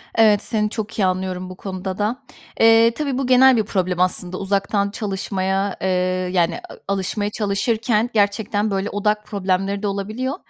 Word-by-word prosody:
Evet, 215 -2 +5
seni 210 -2 0
çok 220 0 -5
iyi 190 - +3
anlıyorum 185 0 -2
bu 185 - -8
konuda 190 -1 -5
da. 225 +6 -1 0.4
Eee, 225 +1 +6
tabii 275 0 -3
bu 270 - -1
genel 255 0 +6
bir 220 - +2
problem 185 -3 -1
aslında. 180 0 0
Uzaktan 200 +1 0
çalışmaya, 195 -2 -2
eee, 190 - 0 0.4
yani, 170 -2 +1
a - - -9 0.2
alışmaya 205 +2 -2
çalışırken 220 +2 0
gerçekten 205 0 +1
böyle 195 +1 -1
odak 210 +1 -1
problemleri 195 0 -1
de - - +1
olabiliyor. 215 +7 -3
205 Hz, 160 wpm, -21 LUFS, 190-220 Hz, 0.4 s, Eee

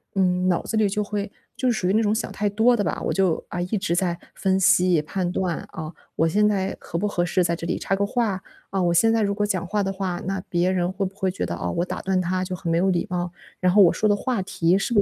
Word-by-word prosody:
嗯， 180 -1 +2
脑 175 - +2
子 220 - -2
里 215 -2 +4
就 210 +1 -1
会 205 0 -4 0.3
就 255 - +1
是 - - +1
属 180 - 0
于 - - +2
那 220 - +3
种 210 0 +2
想 220 - -2
太 210 - -1
多 225 +4 +4
的 205 - +1
吧， - - -2
我 - - 0
就， 190 -4 +1
啊， 175 - -4
一 180 +5 -2
直 185 -3 -1
在 175 -1 +1 0.2
分 190 -1 +1
析、 180 -3 +4
判 180 +3 -2
断， 180 -3 -1
啊， 160 0 -6 0.2
我 165 - +2
现 210 +5 +3
在 195 -2 0
合 170 - -5
不 210 - 0
合 175 -3 0
适 180 +1 +1
在 170 0 0
这 165 - -7
里 - - -1
插 195 - 0
个 200 +1 0
话？ 205 -4 -1 0.3
啊， 195 -1 0
我 170 -1 +2
现 225 +6 +4
在 225 - +2
如 200 0 +1
果 210 - 0
讲 190 -2 -1
话 205 +1 0
的 195 - -1
话， 185 -2 -3
那 195 -1 -1
别 175 +1 +2
人 180 -1 0
会 195 +1 -3
不 195 - -13
会 190 -2 0
觉 - - -4
得， 85 - -3
哦， 90 +1 -3
我 170 - +2
打 - - -5
断 190 -1 +1
他 185 +1 -1
就 185 0 -4
很 170 -1 -3
没 165 - +2
有 190 +2 +2
礼 175 +4 0
貌？ 175 -1 -2 0.3
然 180 -1 +2
后 205 - +7
我 170 - +6
说 215 - +1
的 205 - +4
话 245 -1 -1
题 180 -1 +1
是 200 +4 -1
不 205 - +5
190 Hz, 315 characters per minute, -24 LUFS, 175-205 Hz, 0.3 s, 后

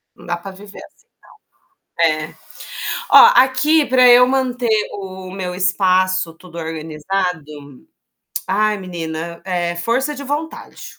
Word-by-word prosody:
Não - - -16
dá 175 0 -2
pra 195 +3 -9
viver 200 +1 -13
assim, 475 - -26
não - - -58 0.9
É. 155 0 -2 0.7
Ó, - - +9
aqui 285 +4 +3
pra 255 -1 +4
eu 245 +1 +7
manter 250 -4 0
o 190 -1 -8
meu 185 -2 -5
espaço, 185 -1 +1
tudo 170 0 -14
organizado 160 +2 -3 1.0
ai, 210 +2 +1
menina, 170 -2 -6
é 175 -2 -2
força 255 +11 -1
de 280 0 -8
vontade, 295 +4 -6
190 Hz, 125 wpm, -18 LUFS, 170-250 Hz, 1.0 s, Ó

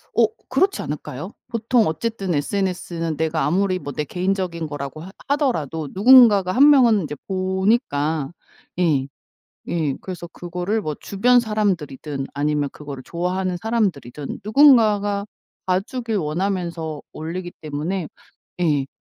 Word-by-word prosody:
어 230 - +6 0.2
그렇지 375 +10 +2
않을까요? 150 +4 -6 0.2
보통 230 0 +2
어쨌든 195 +2 -2
SNS는 170 0 -2
내가 160 0 0
아무리 185 +3 +1
뭐 145 - -6
내 150 - -1
개인적인 180 -1 -2
거라고 145 +1 -6
하 185 - -9 0.2
하더라도 165 - 0
누군가가 205 -3 +7
1 280 +6 +6
명은 240 -8 +5
인제 150 -2 -5
보니까 185 - 0 0.5
예. 145 -6 +2 0.6
예. 155 -5 0
그래서 180 -2 -7
그거를 180 +6 -3
뭐 155 -7 -3
주변 245 +5 +3
사람들이든 165 - -2
아니면 145 0 0
그거를 140 -3 -8
좋아하는 180 +1 -2
사람들이든 170 - -2
누군가가 215 -5 +4 0.4
봐주길 220 +5 -1
원하면서 170 -2 -2
올리기 175 +3 -5
때문에 155 +3 -3 0.5
예. 145 -5 +2
180 Hz, 305 characters per minute, -22 LUFS, 155-210 Hz, 0.6 s, 누군가가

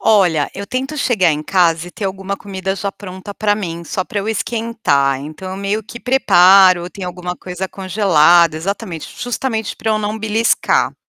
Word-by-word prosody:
Olha, 180 -9 +3
eu 200 +1 -6
tento 265 +6 -3
chegar 205 -11 +2
em 150 +1 -3
casa 170 -2 +2
e - - -12
ter 200 - -7
alguma 195 +1 -3
comida 190 -1 -4
já 200 0 -3
pronta 190 0 -9
para 205 -1 +1
mim, 170 -5 -5
só 185 - -2
para 205 - -4
eu 200 +2 -3
esquentar, 220 - 0
então 155 +6 -8
eu 190 - -5
meio 200 +2 -2
que 235 +3 -10
preparo, 185 -7 +5
tem 195 -3 -7
alguma 180 0 -5
coisa 180 +1 -6
congelada 175 -4 +3
exatamente, 175 -1 -4
justamente 240 -3 -3
para 220 - -2
eu 215 - +1
não 210 +1 -3
beliscar 220 +1 +1
195 Hz, 180 wpm, -17 LUFS, 175-215 Hz, -, preparo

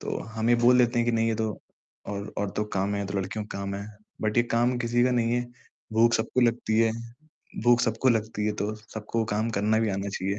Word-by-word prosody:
तो - - -3
हम 110 +1 -3
ये - - +6
बोल 125 +1 +6
देते 120 -1 +3
हैं 120 - +2
कि 120 - +2
नहीं 115 0 +2
ये 115 - +1
तो 110 -1 -1 0.6
और 100 0 -5
औरतों 100 +1 -1
का 100 -2 -3
काम 100 +2 0
है, 100 - -1
ये 100 - -3
तो 100 +1 -2
लड़कियों 95 +3 -4
का 100 - -7
काम 100 0 -3
है 100 +1 -5 0.4
बट 110 +1 0
ये 120 - +6
काम 120 +1 +1
किसी 120 0 +1
का 125 - +3
नहीं 120 -2 +1
है, 120 0 +1 0.5
भूख 115 +2 +4
सबको 115 +3 0
लगती 115 -2 +2
है 115 -1 +3 0.7
भूख 120 0 +5
सबको 115 +1 +1
लगती 110 -2 0
है 105 - +1
तो 105 +1 -2
सबको 110 +1 -4
काम 110 +2 0
करना 110 +1 +1
भी 110 - +1
आना 100 +1 -2
चाहिए, 100 +1 -2
110 Hz, 250 wpm, -27 LUFS, 105-120 Hz, 0.7 s, ये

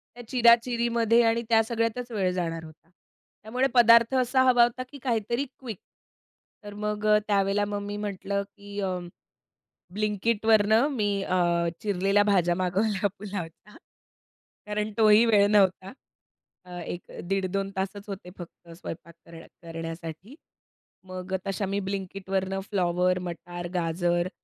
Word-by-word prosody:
त्या 245 - -10
चिरा-चिरीमध्ये 235 -1 +3
आणि 230 0 +2
त्या 225 -1 +5
सगळ्यातच 230 +2 -2
वेळ 195 -5 0
जाणार 165 -2 -3
होता. 160 +1 -15 0.5
त्यामुळे 250 +5 0
पदार्थ 235 0 +6
असा 255 +1 +2
हवा 245 -1 +6
होता, 240 +2 0
की 285 - -11
काहीतरी 235 +1 -1
क्विक. 230 -7 -7 0.9
तर 205 0 -9
मग 210 0 -2
अ, 210 0 +6
त्यावेळेला 200 0 +2
मग 205 0 -3
मी 205 0 -4
म्हटलं, 200 -1 -3
की 205 0 -8
"अं, 180 -2 -3 0.9
ब्लिंकइटवरनं 215 +3 +2
मी 210 -3 +1
अ, 185 - -1 0.5
चिरलेल्या 200 0 +2
भाज्या 175 -2 +3
मागवल्या 190 +3 0
पुलावचा. 200 -1 -8 0.9
कारण 210 +1 -2
तोही 215 0 +6
वेळ 205 -3 +5
नव्हता. 195 -2 +2 0.7
अ, 180 - -15
1 175 +1 -5 0.3
दीड 195 0 0
2 195 0 -1
तासच 195 +2 -4
होते 195 -2 -7
फक्त 175 -1 -12
स्वयंपाक 170 -1 -9
कर 165 -1 -12 0.2
करण्यासाठी. 165 - -7 0.7
मग 185 0 -7
अ, - - +4
तशा 195 +1 -2
मी 200 +1 -1
ब्लिंकइटवरनं 195 0 -3
फ्लॉवर, 180 -2 +1
मटार, 175 0 -7
गाजर 175 0 0
200 Hz, 135 wpm, -26 LUFS, 185-225 Hz, 0.9 s, पदार्थ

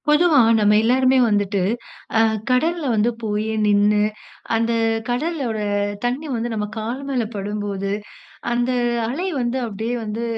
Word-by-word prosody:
பொதுவா 300 0 +5 0.2
நம்ம 210 0 +4
எல்லாருமே 260 +2 +3
வந்துட்டு, 205 -1 +1 0.6
அ - - +5 0.3
கடல்ல 325 +6 +1
வந்து 220 +2 +2
போயி, 215 0 -1 0.2
நின்னு, 210 0 +3 0.6
அந்த 230 +1 +1 0.4
கடலோட 255 -3 -1 0.5
தண்ணீ 260 +6 -2
வந்து 235 +1 -2
நம்ம 210 -1 -1
கால் 230 +5 -3
மேல 255 -3 0
படும்போது. 200 -1 -3 0.6
அந்த 240 +1 +1 0.4
அலை 315 +10 -2
வந்து 245 +1 -1
அப்டியே 220 +2 -3
வந்து 220 +2 -4
230 Hz, 125 wpm, -21 LUFS, 210-260 Hz, 0.6 s, பொதுவா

